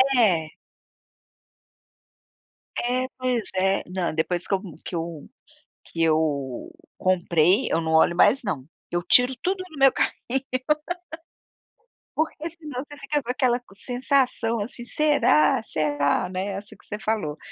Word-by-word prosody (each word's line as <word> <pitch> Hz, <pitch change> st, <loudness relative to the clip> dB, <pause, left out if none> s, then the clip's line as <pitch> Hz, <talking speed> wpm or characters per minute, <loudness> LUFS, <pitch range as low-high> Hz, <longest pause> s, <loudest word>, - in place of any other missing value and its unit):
É. 175 Hz, -10 st, +3 dB, 2.3 s
É. 250 Hz, +1 st, 0 dB
Pois 255 Hz, -2 st, 0 dB
é, 190 Hz, +1 st, +2 dB
não, 180 Hz, -3 st, -1 dB
depois 175 Hz, +2 st, -1 dB
que -, -, -1 dB
eu 190 Hz, -, -3 dB, 0.2 s
que -, -, -5 dB
eu 165 Hz, -2 st, -5 dB, 0.6 s
que 165 Hz, -1 st, -2 dB
eu 150 Hz, -5 st, 0 dB, 0.3 s
comprei 180 Hz, +3 st, +3 dB
eu 165 Hz, -, +2 dB
não 160 Hz, 0 st, -1 dB
olho 160 Hz, +2 st, +5 dB
mais 210 Hz, +9 st, +5 dB
não. 150 Hz, -, -3 dB, 0.3 s
Eu 175 Hz, 0 st, -1 dB
tiro 250 Hz, +8 st, +5 dB
tudo 375 Hz, 0 st, 0 dB
no 315 Hz, -, -12 dB
meu 270 Hz, -1 st, +7 dB
carrinho. -, -, 0 dB, 2.0 s
Porque, 315 Hz, +1 st, -1 dB
senão, 300 Hz, -6 st, -6 dB
você 290 Hz, -, -10 dB
fica 290 Hz, +1 st, -1 dB
com 240 Hz, -, -11 dB
aquela 250 Hz, -1 st, +2 dB
co 240 Hz, -5 st, -21 dB
sensação, 245 Hz, -1 st, +1 dB
assim: 240 Hz, +3 st, -4 dB
"Será? 250 Hz, -, +3 dB
Será, 145 Hz, -5 st, 0 dB
né", 185 Hz, +1 st, -3 dB
é 200 Hz, -, -3 dB
assim 205 Hz, +2 st, -9 dB
que -, -, -22 dB
você 210 Hz, -, -5 dB
falou. 205 Hz, -8 st, -2 dB
205 Hz, 140 wpm, -25 LUFS, 165-255 Hz, 2.3 s, meu